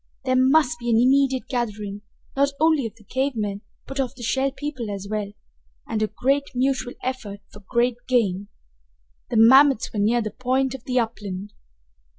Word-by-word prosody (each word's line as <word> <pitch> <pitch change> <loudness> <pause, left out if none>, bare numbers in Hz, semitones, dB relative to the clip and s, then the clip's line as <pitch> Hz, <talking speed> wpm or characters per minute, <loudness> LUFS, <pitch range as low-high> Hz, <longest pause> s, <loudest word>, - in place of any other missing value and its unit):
There 255 -1 +2
must 260 -1 +3
be 240 0 -3
an 230 - +4
immediate 265 +1 +3
gathering, 210 -5 -3 0.3
not 280 +1 +2
only 315 -5 +3
of 220 - -13
the 225 - -19
cave 265 +6 -1
men, 205 -2 -3 0.2
but 270 0 -6
of 260 -1 -1
the 245 - -10
Shell 265 +3 0
People 275 -7 -5
as 200 -1 -5
well, 210 -1 -3 0.6
and 215 -1 -2
great 275 +2 +1
mutual 255 -1 0
effort 235 -6 -4
for 205 - -11
great 240 -1 +1
gain. 205 -6 +1 0.8
The 235 - -1
mammoths 265 +2 +6
were 210 - -2
near 230 +3 +2
the 215 - -4
point 260 +3 0
of 265 -3 -9
the 255 0 -1
upland! 205 -3 -4
245 Hz, 170 wpm, -23 LUFS, 215-265 Hz, 0.8 s, mammoths